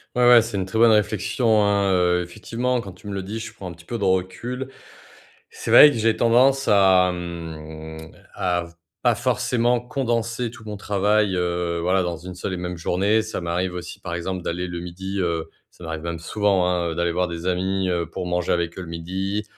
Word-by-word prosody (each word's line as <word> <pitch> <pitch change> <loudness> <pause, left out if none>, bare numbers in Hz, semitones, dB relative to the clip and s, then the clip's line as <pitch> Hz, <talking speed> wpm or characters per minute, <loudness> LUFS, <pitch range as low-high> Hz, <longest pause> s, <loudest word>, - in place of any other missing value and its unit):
Ouais, 125 0 +4
ouais, 120 -1 +9
c'est 115 -2 -4
une 95 - -1
très 95 +4 -4
bonne 115 0 +6
réflexion, 105 +1 +2
hein, 100 -1 +2
heu, 90 -1 +2
effectivement 115 +7 -2
quand 100 -3 -9
tu 95 +3 -14
me 100 - -4
le 95 -1 -3
dis, 105 +4 -5
je 115 - -7
prends 95 - -8
un - - -7
petit 85 0 -17
peu 120 - -4
de 105 - -4
recul. 95 +8 -1 0.8
C'est - - -5
vrai 150 - +10
que - - -4
j'ai 110 0 +2
tendance 130 +4 +4
à, 95 -2 +5
mmh, 80 -2 -8 0.2
à 90 -1 0 0.4
pas - - +4
forcément 120 0 +1
condenser 120 -3 -2
tout 115 -2 -14
mon 105 -1 -5
travail, 105 0 +1
heu, 85 -1 -1
voilà, 95 +2 +2
dans 85 -2 -3
une 90 +1 -9
seule 95 - -4
et - - -3
même 90 0 -4
journée. 100 +6 +1
Ça 110 0 -5
m'arrive 90 +2 -2
aussi, 90 -1 -7
par 85 - -5
exemple, 90 +1 -4
d'aller 90 +2 -3
le 85 0 -5
midi, 95 +3 -5
heu, 85 -2 -2 0.2
ça - - -16
m'arrive 80 -1 -5
même 85 -1 -4
souvent, 95 +1 +1
hein, 85 -2 0
d'aller 85 0 0
voir 90 0 0
des 85 0 -6
amis, 95 +1 0
heu, 85 -1 0
pour - - -5
manger 90 0 -1
avec 85 -1 -2
eux - - -4
le 85 - -10
midi. 95 +5 -3
95 Hz, 210 wpm, -23 LUFS, 85-110 Hz, 0.8 s, vrai